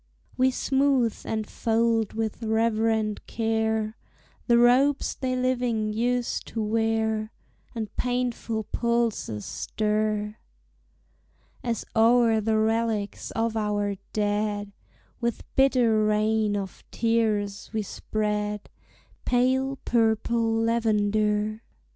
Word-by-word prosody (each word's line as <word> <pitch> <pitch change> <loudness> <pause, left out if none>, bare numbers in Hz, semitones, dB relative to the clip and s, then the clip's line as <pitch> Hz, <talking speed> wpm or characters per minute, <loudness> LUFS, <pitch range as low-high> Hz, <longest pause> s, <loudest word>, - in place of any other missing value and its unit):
We 255 +1 +3
smooth 265 -3 +1
and 220 -1 -2
fold 225 -1 +1
with 220 0 -3
reverent 220 -1 0
care 220 -1 -1 0.5
The 235 -1 +5
robes 255 +4 +4
they 255 -2 -2
living 245 -4 0
used 245 +2 -1
to 225 - -3
wear; 220 0 0 0.4
And 220 -2 -5
painful 245 -3 -1
pulses 235 - -1
stir 210 0 -1 1.3
As 235 -2 -2
o'er 225 0 +4
the 220 +1 +1
relics 220 -1 0
of 225 0 0
our 205 -2 0 0.2
dead, 205 -1 -1 0.5
With 235 -1 -2
bitter 245 -5 +4
rain 215 0 +2
of 195 -2 -6
tears, 215 -4 0
we 220 -1 -1
spread 210 0 -3 0.5
Pale 260 +2 +1
purple 225 0 +2
lavender. 215 -1 +1
220 Hz, 95 wpm, -26 LUFS, 215-235 Hz, 1.3 s, The